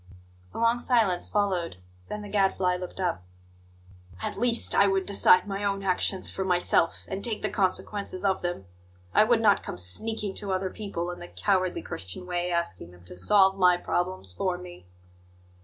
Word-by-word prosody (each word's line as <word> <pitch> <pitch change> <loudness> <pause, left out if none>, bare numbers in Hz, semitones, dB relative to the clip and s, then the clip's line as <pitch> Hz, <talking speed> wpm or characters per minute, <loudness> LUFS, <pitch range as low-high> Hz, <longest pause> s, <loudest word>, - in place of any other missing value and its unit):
A - - -10
long 230 +1 +2
silence 225 -8 +1
followed; 185 - 0 0.3
then 210 0 -5
the - - -7
Gadfly 190 -3 +1
looked 180 +1 -7
up. 180 - -1 1.0
"At - - -4
least, 240 0 +2
I 200 - +5
would 195 -1 +1
decide 195 -1 +4
my 200 0 -3
own 195 -1 -1
actions 190 0 +1
for 190 - -3
myself, 180 -2 +1
and 195 +1 -5
take 225 -3 -1
the - - 0
consequences 200 0 -2
of 190 -1 +1
them. 175 - -4 0.5
I - - +6
would 225 +1 +3
not 205 -3 +4
come - - -7
sneaking 205 - -2
to 200 -2 -4
other 185 0 -1
people, 180 -5 -4
in 175 - -8
the 175 - -9
cowardly 185 -2 0
Christian 95 - -7
way, 175 0 -2
asking 140 - -2
them 90 0 -17
to 90 - -11
solve 195 - +3
my 180 -1 +5
problems 175 - -2
for 180 - -1
me!" 175 - -12
190 Hz, 175 wpm, -27 LUFS, 175-205 Hz, 1.0 s, I